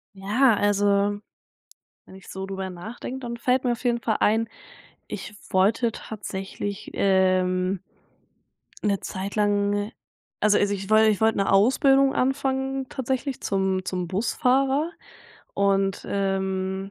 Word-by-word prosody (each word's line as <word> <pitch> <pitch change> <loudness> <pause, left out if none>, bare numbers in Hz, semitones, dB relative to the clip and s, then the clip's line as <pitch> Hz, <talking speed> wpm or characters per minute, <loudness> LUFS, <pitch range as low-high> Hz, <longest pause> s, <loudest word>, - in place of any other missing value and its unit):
Ja, 215 +6 +3
also 205 0 +2 0.8
wenn 190 - -14
ich 190 - -14
so 190 0 -5
drüber 190 -1 -5
nachdenke, 220 +8 -7
dann 240 -2 -5
fällt 250 +2 +1
mir 240 - +2
auf 235 - -8
jeden 240 -1 +1
Fall 220 -2 0
ein: 225 +2 +3 0.6
Ich - - -7 0.2
wollte 215 +5 +3
tatsächlich, 200 -1 -6
ähm 185 -1 +2 1.1
'ne 200 -2 +1
Zeit 195 0 -5
lang 205 0 +1 0.5
also 210 -1 +4
also 205 0 +1
ich 195 0 -5
woll 215 0 +6
ich 215 -2 +3
wollte 220 0 +3
'ne 195 - +1
Ausbildung 270 +6 +4
anfangen 265 0 -1
tatsächlich 265 +1 -3
zum 190 -1 0
zum 180 -1 -3
Busfahrer 265 - +1 0.6
und, 195 -1 +1
ähm 190 0 -2
205 Hz, 130 wpm, -25 LUFS, 195-240 Hz, 1.1 s, woll